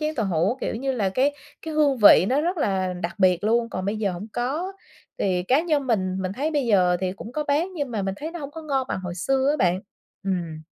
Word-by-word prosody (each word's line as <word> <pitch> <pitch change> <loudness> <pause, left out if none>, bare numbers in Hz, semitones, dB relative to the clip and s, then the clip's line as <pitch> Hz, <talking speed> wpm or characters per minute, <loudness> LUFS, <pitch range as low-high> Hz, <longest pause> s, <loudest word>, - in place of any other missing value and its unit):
chén 310 0 -1
tàu 225 -6 -1
hủ 180 +6 +1
kiểu - - -2
như 265 +4 -2
là 215 -6 0
cái 265 +9 +1 0.3
cái 320 -1 -5
hương 290 -3 +3
vị 200 -3 +8
nó 270 +3 +2
rất 350 +4 -1
là 190 - 0
đặc 170 0 -3
biệt 185 0 +3
luôn. 230 +1 +2
Còn 185 - -4
bây 200 +3 -1
giờ 205 -3 -1
hổng 180 +5 -6
có. 300 +11 -2 0.5
Thì 180 -2 +1
cá 255 +10 +3
nhân 305 -5 0
mình, 185 -6 0
mình 185 - -2
thấy 285 +9 -2
bây 290 -5 0
giờ 180 -5 +4
thì 185 -1 -1
cũng 215 +4 -9
có 300 +2 -2
bán 295 +6 +1
nhưng 285 -6 -3
mà 215 -3 -2
mình 195 0 -2
thấy 310 +7 -5
nó 345 - -7
hổng 285 -3 -6
có 320 +2 -9
ngon 270 -4 -1
bằng - - -2
hồi 180 -1 -5
xưa 265 +9 0
á 300 - +1
bạn. 180 -6 +2 0.4
Ừm. 170 -5 -3
230 Hz, 260 wpm, -24 LUFS, 185-290 Hz, 0.5 s, vị